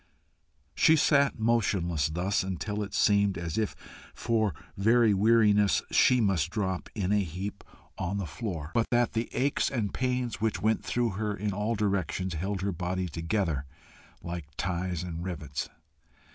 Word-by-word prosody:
She 160 - +5
sat 140 -2 +3
motionless 95 - +1
thus, 90 +5 0
until 95 +3 -3
it 100 - -5
seemed 100 -2 +3
as 85 -2 -4
if 110 -2 -1 0.4
for 110 -7 0 0.2
very 110 +2 +4
weariness 105 -1 +4
she 125 - +5
must 95 -7 +1
drop 95 -2 -2
in 100 -3 -1
a 105 0 +3
heap 95 +4 -6 0.4
on 95 +4 -2
the 100 - -2
floor, 80 -1 -5
but 115 -1 +2
that 120 -1 +2
the 115 +1 -1
aches 140 +2 +1
and 115 -7 -2
pains 125 -3 -1
which 110 -1 0
went 110 +1 +1
through 120 -1 0
her 105 +1 -2
in 105 +1 -2
all 105 +4 -1
directions 95 -3 -1
held 95 +4 -2
her 100 +1 0
body 90 +1 -2
together 80 -3 -2 0.6
like 85 -2 -5
ties 90 -1 -2
and 85 -1 -5
rivets. 75 -6 -4
100 Hz, 155 wpm, -29 LUFS, 90-110 Hz, 0.6 s, She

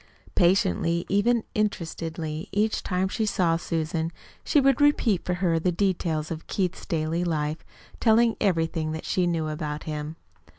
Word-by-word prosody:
Patiently, 170 - +2
even 220 +4 +2
interestedly, 165 -4 -3
each 210 +2 +1
time 185 0 0
she 215 +3 -1
saw 175 -5 +2
Susan, 165 -1 -2 0.3
she 300 - +3
would 275 +1 +3
repeat 245 -10 +3
for 180 - -1
her 175 -2 +1
the 180 +2 +1
details 170 -4 -1
of 165 -1 -6
Keith's 185 -2 -2
daily 165 -1 -1
life, 155 -2 -1 0.4
telling 230 0 +4
everything 165 -4 0
that 160 - -6
she 180 -1 +1
knew 165 -2 0
about 150 -1 -4
him. 150 0 -5
170 Hz, 145 wpm, -26 LUFS, 160-200 Hz, 0.4 s, telling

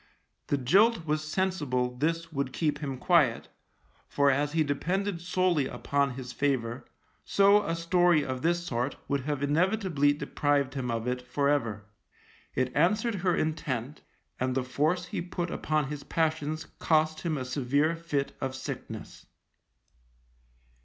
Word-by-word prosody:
The 145 - +1
jilt 185 - +4
was 155 0 0
sensible 145 -10 0
this 165 +4 -1
would 140 -2 -2
keep 155 -3 0
him 140 -3 -4
quiet, 140 -5 +2 0.6
for 140 -1 +3
as 145 +2 0
he 160 -1 +3
depended 180 +5 -1
solely 175 -5 +1
upon 140 -2 -1
his 125 -1 -7
favour, 130 -4 -1 0.4
so 200 +1 +5
a 165 -4 -1
story 170 -2 +3
of 130 -1 -4
this 175 +1 +1
sort 125 -2 -2
would 140 -1 0
have 145 -2 -2
inevitably 165 -1 +2
deprived 145 -2 0
him 130 -3 -3
of 115 -1 -2
it 125 0 -1
for 140 +3 0
ever. 115 -8 0 0.7
It 130 0 -1
answered 210 +9 +2
her 180 -2 +2
intent, 150 -4 -2 0.4
and 130 0 0
the 130 - +1
force 155 +8 0
he - - -4
put 175 0 -4
upon 155 -3 -1
his 150 -1 -5
passions 155 -1 -1
cost 155 -1 +2
him 160 -3 -1
a 130 - -3
severe 140 +5 +1
fit 155 -4 -2
of 130 0 -2
sickness. 130 - -7
150 Hz, 145 wpm, -29 LUFS, 130-170 Hz, 0.7 s, so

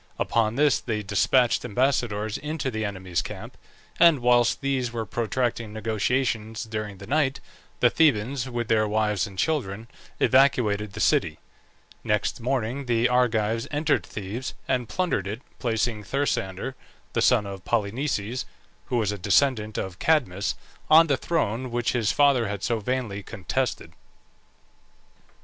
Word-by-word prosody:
Upon 115 -1 +1
this 145 +1 +3
they 110 -3 -3
despatched 115 +5 +2
ambassadors 115 -3 0
into 150 -2 -3
the 110 -1 -3
enemy's 95 -3 -2
camp; - - -8 0.4
and 170 -3 +7
whilst 120 +1 +3
these 135 -3 -1
were 115 -1 -3
protracting 115 0 -2
negotiations 110 0 -1
during 105 -3 -5
the 100 - -10
night, 140 +1 +1 0.4
the 120 - +5
Thebans, 130 -3 +2
with 120 -2 -3
their 110 -1 +2
wives 105 -1 0
and 95 -2 -12
children, 115 - -1 0.3
evacuated 110 -7 +3
the - - -7
city. 80 -1 +2 0.7
Next 105 +3 0
morning 130 +1 -2
the 120 0 +3
Argives 115 -1 +1
entered 150 0 +1
Thebes 110 +5 -6
and 125 -3 -1
plundered 175 - -1
it, 110 +6 -5 0.2
placing 115 -2 -1
Thersander, 130 -2 -2 0.4
the - - +1
son 115 -5 +4
of 100 -2 -7
Polynices 115 +1 -1 0.4
(who 125 - -1
was 105 -3 +1
a 105 - -5
descendant 110 +2 +2
of 95 -1 -4
Cadmus), 105 - +1 0.3
on 160 +2 +8
the 145 -4 +2
throne 130 -7 -1
which 120 0 0
his 115 -5 +1
father 140 -6 +3
had 100 -1 -5
so 115 -2 0
vainly 110 -3 -2
contested. 115 +6 -3
115 Hz, 140 wpm, -25 LUFS, 105-130 Hz, 0.7 s, on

